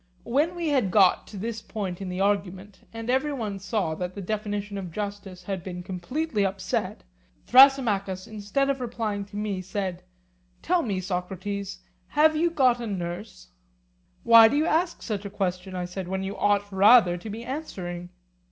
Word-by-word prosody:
When 300 +8 +1
we 340 -2 -2
had 260 -9 +2
got 190 -1 +4
to 210 - -9
this 225 +2 -4
point 195 -5 -5
in 190 - -4
the 180 +1 -4
argument, 195 -1 -2
and 225 0 -7
every 265 +4 +1
one 215 -7 -4
saw 195 -4 -1
that 180 +3 -5
the - - -6
definition 205 0 -3
of 180 -3 -7
justice 200 -1 -6
had 190 -2 -4
been 180 -1 -6
completely 205 - -2
upset, 195 0 -2 0.4
Thrasymachus, 225 -8 +5
instead 220 +6 -1
of 270 -1 -4
replying 220 -4 -3
to 205 +1 -14
me, 205 -3 -2
said: 185 -1 -4 0.6
Tell 360 +1 +2
me, 200 - -2
Socrates, 190 +2 -4 0.3
have 310 +1 +4
you 335 +3 +2
got 255 -7 +3
a 235 - -4
nurse? 180 - -6 0.7
Why 230 -1 +9
do 280 - 0
you 305 - +2
ask 335 +2 0
such 210 -3 -3
a 200 - -5
question, 185 -1 -3
I 180 -1 -2
said, 180 +1 -6
when 190 +1 -2
you 195 +1 -4
ought 205 0 +1
rather 195 -1 +6
to 195 +5 -8
be 220 +3 -6
answering? 180 - -6
205 Hz, 175 wpm, -26 LUFS, 185-235 Hz, 0.7 s, Why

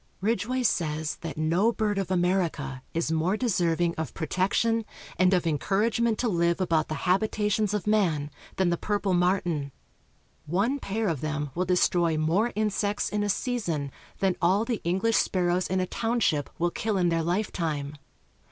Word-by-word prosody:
Ridgway 230 +5 0
says 160 -7 0
that 160 -4 -7
no 170 +8 +2
bird 210 -3 -1
of 195 - -3
America 175 -8 0
is 165 -1 -1
more 165 +6 +1
deserving 175 -7 +1
of 160 -5 -4
protection 195 +7 +1 0.4
and 185 0 +5
of 180 -2 +2
encouragement 215 +8 +1
to 245 - 0
live 170 -3 +1
about 165 -4 +1
the 155 - -3
habitations 210 +2 +1
of 210 -3 -2
man 170 -9 +1 0.2
than 185 -2 +2
the 170 - +1
purple 205 -1 -1
martin. 175 -5 +1 0.8
One 205 - +1
pair 220 0 -2
of 160 -7 -1
them 150 -2 -3
will 180 +2 -1
destroy 175 -2 +2
more 175 +10 +1
insects 210 -1 0
in 210 - -1
a 205 - -1
season 175 - -1 0.3
than 190 -2 +1
all 190 +5 +3
the 235 -3 -2
English 190 +7 +1
sparrows 180 -1 +1
in 190 +1 0
a 185 - +1
township 225 - 0
will 175 +1 +1
kill 215 +1 -1
in 175 -2 +2
their 165 -1 +1
life 180 +6 -1
time. 150 -4 -3
185 Hz, 165 wpm, -27 LUFS, 165-210 Hz, 0.8 s, and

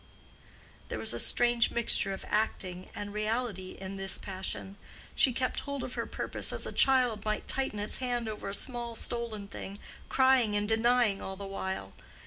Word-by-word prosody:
There - - -3
was - - +1
a - - -3
strange 240 -1 +4
mixture 235 -4 +2
of 195 - -6
acting 185 -4 -1
and 205 0 -5
reality 215 -3 -2
in 195 +1 -6
this 195 0 +1
passion. 190 0 -5 0.4
She 265 - +3
kept 255 +1 -1
hold 280 -2 -4
of 255 - -5
her - - -3
purpose - - 0
as - - +3
a - - -3
child 250 -5 +4
might 215 0 -2
tighten 265 -5 0
its 205 +1 -3
hand 245 -2 -2
over 210 -2 -5
a - - -4
small 240 -1 +1
stolen 225 -3 -3
thing, 200 0 -7 0.3
crying 260 -5 +4
and 205 0 0
denying 225 -2 +3
all 190 - -5
the 200 +1 -7
while. 190 -1 -4
215 Hz, 175 wpm, -30 LUFS, 195-240 Hz, 0.4 s, strange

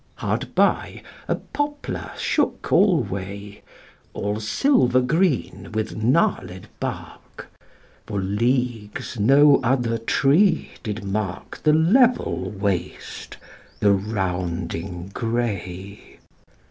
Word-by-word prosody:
Hard - - -3
by - - +1 0.2
a - - +1
poplar 290 0 -4
shook - - -1
alway, 100 - 0 0.5
All 105 +1 -2
silver 130 - +3
green 155 +2 0
with 110 0 -2
gnarled 110 - 0
bark: - - -7 0.6
For 100 - -2
leagues 115 +2 -1
no 140 +6 +6
other 120 -2 +1
tree 155 - +2
did 105 0 -5
mark 100 -2 -4
The 150 - +4
level 235 - +3
waste, 95 -3 -4 0.4
the 100 -1 +4
rounding 90 -2 -3
gray. 100 -5 -4
110 Hz, 90 wpm, -23 LUFS, 100-140 Hz, 0.6 s, no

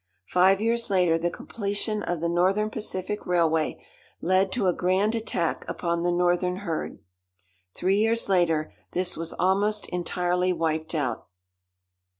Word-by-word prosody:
Five 185 - +4
years 235 +1 +1
later 180 -4 +3
the 170 +1 0
completion 205 +3 -3
of 175 -5 -3
the 170 - 0
Northern 190 +5 +1
Pacific 210 0 -4
railway 165 -3 +1 0.3
led 185 +2 +2
to 225 -6 0
a 180 - +3
grand 190 +5 +1
attack 215 -7 -1
upon 170 -1 -2
the 175 - +1
northern 180 +1 +1
herd. 165 -2 -3 0.8
Three 190 +3 +1
years 225 +2 +2
later 165 -5 +1 0.2
this 180 0 0
was 165 +1 -5
almost 205 +3 +1
entirely 180 +1 0
wiped 160 -1 -2
out. 140 -5 -2
180 Hz, 140 wpm, -26 LUFS, 170-200 Hz, 0.8 s, Five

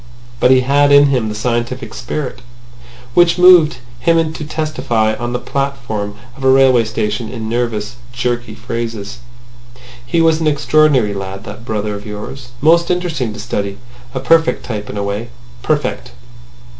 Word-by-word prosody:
But - - +4
he 130 0 +6
had 145 +2 +3
in 145 0 +7
him 125 -5 0
the 105 - -5
scientific 120 +1 -2
spirit, 135 -4 -5 0.7
which 175 +2 +4
moved 180 -6 +6 0.2
him 165 +4 +2
to 160 - -6
testify 135 -8 -1
on 120 +1 -4
the 125 - -1
platform 120 -8 -3 0.2
of 135 - -11
a 130 - +4
railway 130 -3 +5
station 110 +1 -2
in 115 -3 -5
nervous 115 -1 -2
jerky 120 -2 -3
phrases. 115 -2 -5 0.8
"He 120 +8 0
was 165 -1 +3
an 160 - +1
extraordinary 145 -6 +3
lad, 95 0 -6
that 115 - -9
brother 105 -2 -2
of 100 +1 -8
yours. 105 +6 -7
Most 170 +3 +4
interesting 170 -10 -1
to 105 - -9
study. 100 -3 -3 0.4
A - - -1
perfect 165 +4 +2
type 105 -4 -5
in - - -6
a 100 - -1
way. 100 +4 -3 0.3
Perfect!" - - -2
125 Hz, 155 wpm, -16 LUFS, 110-145 Hz, 0.8 s, in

